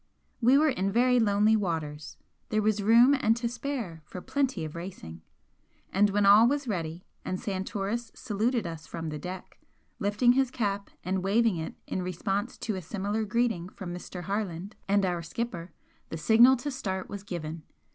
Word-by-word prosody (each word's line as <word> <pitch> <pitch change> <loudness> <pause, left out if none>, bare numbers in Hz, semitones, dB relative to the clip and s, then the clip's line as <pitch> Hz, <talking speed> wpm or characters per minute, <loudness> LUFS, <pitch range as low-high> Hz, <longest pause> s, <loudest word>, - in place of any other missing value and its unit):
We 250 +4 +6
were 310 +1 +4
in 195 -6 0
very 250 +3 +4
lonely 210 0 +4
waters, 160 -7 -3 0.3
there 215 -1 +1
was 215 -1 +2
room 235 +6 +6
and 230 -4 +2
to 235 0 -1
spare 235 - -4
for 180 - -8
plenty 260 - -1
of 155 - -7
racing, 170 - -8 0.7
and 205 +2 +4
when 200 0 +2
all 210 +3 +8
was 280 +1 0
ready 170 -4 -3 0.2
and 185 - -3
Santoris 205 +2 -3
saluted 225 0 -1
us 165 -3 -7
from 165 -1 -5
the 150 -1 -5
deck, 185 +2 -8 0.4
lifting 210 +4 +3
his 265 0 +2
cap 200 -5 -2
and 185 +1 -1
waving 215 0 +2
it 160 - -5
in 185 - -3
response 195 +5 -2
to 220 - -3
a 185 - -4
similar 205 +5 -2
greeting 215 -5 0
from 180 -2 -7
Mr. 180 0 -7
Harland 195 0 -3
and 200 0 +3
our 175 -2 -1
skipper, 175 -1 -5 0.4
the 160 - -4
signal 225 +11 +6
to 285 +4 -4
start 190 -8 -3
was 200 -1 -6
given. 165 -5 -6
200 Hz, 175 wpm, -28 LUFS, 180-230 Hz, 0.7 s, all